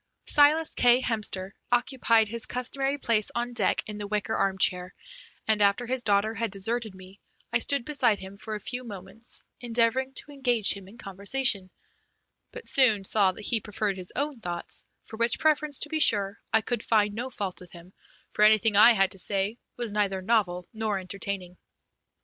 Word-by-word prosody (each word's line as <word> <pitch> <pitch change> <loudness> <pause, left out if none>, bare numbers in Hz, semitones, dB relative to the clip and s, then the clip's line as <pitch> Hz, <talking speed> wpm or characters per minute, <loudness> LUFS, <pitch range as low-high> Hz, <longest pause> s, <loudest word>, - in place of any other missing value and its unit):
Silas 300 +2 +4
K. 245 0 +4
Hemster 205 -5 -3 0.2
occupied 240 -3 +2
his 230 +2 -2
customary 270 +3 -1
place 225 -6 0
on 240 +1 -3
deck - - +1
in 210 0 -8
the 205 - -5
wicker 210 +1 -2
armchair, 185 -2 0 0.5
and 215 -1 +2
after 200 +4 +2
his 255 +1 -1
daughter 210 -1 +1
had 225 +1 -2
deserted 220 +1 -3
me 185 +1 -15 0.3
I 235 - +4
stood 275 +1 0
beside 255 -8 +1
him 195 +1 -11
for 215 0 -6
a - - -5
few 245 +4 -5
moments, 200 +1 -4 0.2
endeavouring 245 +3 0
to 295 - -4
engage 245 -6 +3
him 195 -2 -11
in 210 +4 -15
conversation, 200 -1 0 0.8
but 480 -2 -9
soon 225 -7 +5
saw 195 -1 +3
that 210 - -8
he 225 -3 +1
preferred 210 -1 -3
his 180 -1 -8
own 285 -3 -2
thoughts, 175 -4 -3 0.2
for 220 - -10
which 235 +1 +1
preference, 305 -2 +1
to 300 - +1
be 315 0 -2
sure, 205 -7 +2
I 220 - +3
could 235 +1 -3
find 210 -3 +1
no 240 +4 -4
fault 200 -7 -5
with 180 - -13
him, 170 0 -13 0.4
for - - -4
anything 215 0 +4
I 225 +4 +8
had 195 -3 +2
to 195 - -4
say 200 +4 -1 0.2
was 235 -4 -3
neither 200 -2 0
novel 185 -5 0
nor 220 -2 -2
entertaining. 185 -1 -5
215 Hz, 180 wpm, -26 LUFS, 195-245 Hz, 0.8 s, I